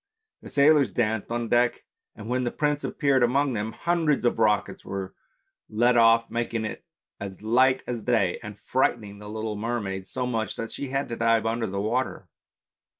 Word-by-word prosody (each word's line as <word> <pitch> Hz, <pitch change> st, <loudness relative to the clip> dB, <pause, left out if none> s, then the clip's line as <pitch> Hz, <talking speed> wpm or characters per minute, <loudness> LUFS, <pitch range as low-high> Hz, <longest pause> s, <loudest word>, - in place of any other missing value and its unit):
The -, -, -10 dB
sailors 145 Hz, 0 st, +4 dB
danced 110 Hz, -2 st, -1 dB
on 120 Hz, 0 st, -1 dB
deck, 120 Hz, +1 st, +1 dB, 0.3 s
and 105 Hz, -, -9 dB
when 125 Hz, +1 st, 0 dB
the 120 Hz, -, 0 dB
prince 150 Hz, +2 st, -1 dB
appeared 140 Hz, -3 st, +1 dB
among 135 Hz, +3 st, +2 dB
them 110 Hz, 0 st, -2 dB
hundreds 165 Hz, -5 st, 0 dB
of 120 Hz, -, +1 dB
rockets 105 Hz, -2 st, +1 dB
were 95 Hz, -1 st, -5 dB, 0.6 s
let 120 Hz, +3 st, +3 dB
off 115 Hz, 0 st, +5 dB
making 115 Hz, -1 st, -2 dB
it 110 Hz, -, -6 dB, 0.4 s
as 100 Hz, 0 st, -8 dB
light 130 Hz, +4 st, +3 dB
as 120 Hz, -2 st, -4 dB
day, 105 Hz, -7 st, +1 dB
and 105 Hz, -1 st, -9 dB
frightening 105 Hz, -6 st, -1 dB
the 105 Hz, 0 st, -9 dB
little 110 Hz, 0 st, -4 dB
mermaid 105 Hz, -4 st, -3 dB
so 125 Hz, -1 st, -3 dB
much 115 Hz, -3 st, -2 dB
that 115 Hz, -, -5 dB
she 140 Hz, -, -4 dB
had 135 Hz, +1 st, -1 dB
to 115 Hz, -, -3 dB
dive 115 Hz, -1 st, +2 dB
under 115 Hz, 0 st, -1 dB
the 100 Hz, +1 st, -3 dB
water. 120 Hz, +6 st, -2 dB
115 Hz, 180 wpm, -26 LUFS, 110-125 Hz, 0.6 s, off